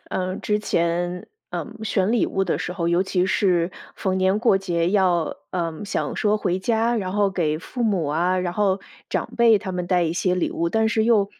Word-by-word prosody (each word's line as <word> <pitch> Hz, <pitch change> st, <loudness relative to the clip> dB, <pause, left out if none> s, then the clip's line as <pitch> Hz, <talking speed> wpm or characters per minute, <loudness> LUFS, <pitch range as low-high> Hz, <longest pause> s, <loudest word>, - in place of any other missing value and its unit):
呃， 185 Hz, 0 st, -2 dB
之 210 Hz, 0 st, 0 dB
前， 175 Hz, -2 st, -1 dB, 0.2 s
呃， -, -, -3 dB, 0.2 s
选 200 Hz, -1 st, +1 dB
礼 240 Hz, -, +2 dB
物 195 Hz, -, -1 dB
的 180 Hz, -, 0 dB
时 175 Hz, -, -3 dB
候， 170 Hz, -2 st, -1 dB
尤 170 Hz, +1 st, +3 dB
其 185 Hz, -1 st, 0 dB
是 185 Hz, -3 st, +2 dB, 0.2 s
逢 190 Hz, -1 st, -1 dB
年 190 Hz, +2 st, +2 dB
过 210 Hz, -5 st, +4 dB
节 175 Hz, -2 st, 0 dB
要， 180 Hz, -5 st, +2 dB
呃， 170 Hz, +1 st, -3 dB
想 -, -, -2 dB
说 210 Hz, 0 st, +2 dB
回 185 Hz, -3 st, -1 dB
家， 230 Hz, +3 st, +1 dB
然 185 Hz, -3 st, -2 dB
后 205 Hz, -1 st, +2 dB
给 155 Hz, -5 st, 0 dB
父 240 Hz, +7 st, -4 dB
母 190 Hz, -8 st, +1 dB
啊， 175 Hz, +5 st, +1 dB
然 175 Hz, -1 st, -2 dB
后 195 Hz, -1 st, +1 dB, 0.3 s
长 -, -, -2 dB
辈 230 Hz, -2 st, +6 dB
他 195 Hz, -3 st, -6 dB
们 180 Hz, -1 st, -3 dB
带 180 Hz, -1 st, +2 dB
一 165 Hz, -1 st, 0 dB
些 180 Hz, +1 st, +1 dB
礼 180 Hz, -, 0 dB
物， 170 Hz, 0 st, -1 dB
但 220 Hz, +3 st, +2 dB
是 220 Hz, 0 st, +1 dB
又 210 Hz, -4 st, +3 dB
185 Hz, 225 characters per minute, -23 LUFS, 175-210 Hz, 0.3 s, 辈